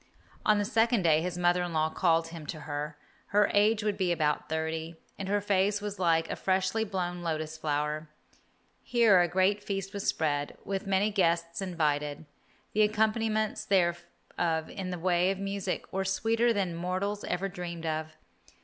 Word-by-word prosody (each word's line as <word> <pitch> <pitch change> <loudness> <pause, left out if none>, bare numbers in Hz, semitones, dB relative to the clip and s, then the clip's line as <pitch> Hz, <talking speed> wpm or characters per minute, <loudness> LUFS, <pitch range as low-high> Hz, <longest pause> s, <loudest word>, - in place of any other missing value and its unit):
On 215 -1 +5
the 205 - +1
second 225 -2 +2
day 160 -2 +4
his 180 +1 -3
mother 175 0 +3
in 175 -1 -3
law 155 0 +1
called 165 -1 +2
him 165 -3 -9
to 155 - -5
her. 150 0 -4 0.3
Her 205 0 +3
age 210 +1 +3
would 210 -2 0
be 185 -3 +1
about 150 -3 0
thirty, 160 +1 -3 0.2
and 195 -1 -4
her 205 +1 +2
face 200 +1 +2
was 205 -1 -5
like 165 -2 +2
a - - -3
freshly 190 +3 +1
blown 180 -4 -3
lotus 155 -2 -3
flower. 150 0 -2 0.7
Here 230 -6 +4
a 175 - +3
great 190 +4 +2
feast 195 0 -4
was 200 -1 -4
spread, 145 -2 0
with 195 0 -3
many 195 +2 +2
guests 170 -3 +1
invited. 150 -5 -1 0.5
The 215 - +3
accompaniments 215 0 +1
thereof 175 -3 +1 0.6
in 190 -2 -5
the 180 - -3
way 175 +1 +2
of 195 - -1
music 195 -1 -3
were 195 0 0
sweeter 225 +5 +2
than 195 -5 0
mortals 185 +4 -2
ever 180 +2 -1
dreamed 175 -3 -6
of. 155 0 -3
180 Hz, 170 wpm, -29 LUFS, 165-200 Hz, 0.7 s, On